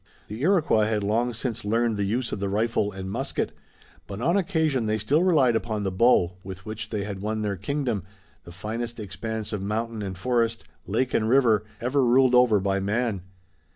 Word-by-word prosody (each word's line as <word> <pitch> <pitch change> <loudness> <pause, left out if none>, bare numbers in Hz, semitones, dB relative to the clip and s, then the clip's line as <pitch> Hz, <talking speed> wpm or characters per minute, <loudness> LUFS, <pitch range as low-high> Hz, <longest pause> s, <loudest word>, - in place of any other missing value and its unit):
The 110 +4 -6
Iroquois 155 - +3
had 110 -2 0
long 115 +4 +1
since 120 0 -4
learned 115 +2 +1
the 100 - -1
use 120 +5 -1
of - - -3
the 100 0 -2
rifle 105 0 0
and 95 -1 -7
musket, 95 - -2 0.6
but 100 0 -6
on 165 +9 +2
occasion 160 - +1
they 110 0 +1
still 135 +10 +2
relied 150 -10 +4
upon 110 -2 -2
the 95 - -1
bow, 95 -3 +3
with 95 0 -9
which 110 0 -6
they 105 -3 -2
had 100 -2 -6
won 110 +1 -2
their 100 -1 -1
kingdom, 115 - -2 0.4
the 85 - -11
finest 115 +6 -5
expanse 110 +2 -5
of 105 - -2
mountain 110 +2 -3
and 95 -2 -5
forest, 115 +1 0 0.2
lake 130 0 0
and 110 -1 +1
river, 115 -5 +4
ever 130 +3 +1
ruled 125 +1 +4
over 125 -4 +5
by 100 0 0
man. 105 0 -1
110 Hz, 190 wpm, -25 LUFS, 100-125 Hz, 0.6 s, over